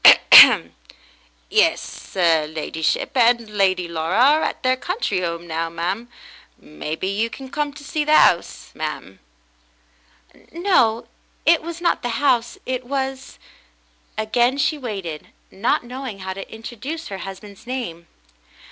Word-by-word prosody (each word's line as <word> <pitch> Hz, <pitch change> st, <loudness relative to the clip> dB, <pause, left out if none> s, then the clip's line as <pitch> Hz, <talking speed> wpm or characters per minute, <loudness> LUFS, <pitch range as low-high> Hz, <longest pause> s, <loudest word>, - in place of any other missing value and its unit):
"Yes, -, -, 0 dB
'er 165 Hz, -4 st, +3 dB
ladyship 160 Hz, -, -2 dB
and 235 Hz, -2 st, +3 dB
Lady 190 Hz, -3 st, +1 dB
Laura 165 Hz, +3 st, -2 dB
are 285 Hz, +6 st, +5 dB
at -, -, -3 dB
their 255 Hz, 0 st, +3 dB
country 255 Hz, -, -2 dB
'ome 170 Hz, 0 st, -4 dB
now, 165 Hz, 0 st, -3 dB
ma'm. 185 Hz, +8 st, -4 dB, 0.5 s
Maybe 150 Hz, -, -6 dB
you 210 Hz, +4 st, -1 dB
came 265 Hz, +2 st, -10 dB, 0.2 s
to 290 Hz, +1 st, -13 dB
see 300 Hz, +1 st, -2 dB
the 305 Hz, -, -1 dB
'ouse, 175 Hz, -, +3 dB
ma'm.?" 150 Hz, -11 st, -6 dB, 1.3 s
"No, 330 Hz, -, +1 dB, 0.4 s
it 335 Hz, -1 st, +4 dB
was 340 Hz, +1 st, -7 dB
not 345 Hz, -, +1 dB
the 240 Hz, -1 st, -3 dB
house 255 Hz, -4 st, +1 dB
— -, -, -39 dB
it 255 Hz, -, -6 dB
was 265 Hz, 0 st, -4 dB, 0.2 s
— -, -, -36 dB
" -, -, -38 dB
Again 240 Hz, +4 st, +1 dB
she 285 Hz, +2 st, +1 dB
waited, 195 Hz, -, -6 dB, 0.2 s
not 200 Hz, +6 st, 0 dB
knowing 250 Hz, -3 st, -7 dB
how 190 Hz, 0 st, -6 dB
to 195 Hz, 0 st, -9 dB
introduce 245 Hz, +8 st, -7 dB
her 195 Hz, -1 st, -6 dB
husband's 195 Hz, +3 st, -10 dB
name. 200 Hz, -10 st, -5 dB
220 Hz, 140 wpm, -21 LUFS, 170-260 Hz, 1.3 s, are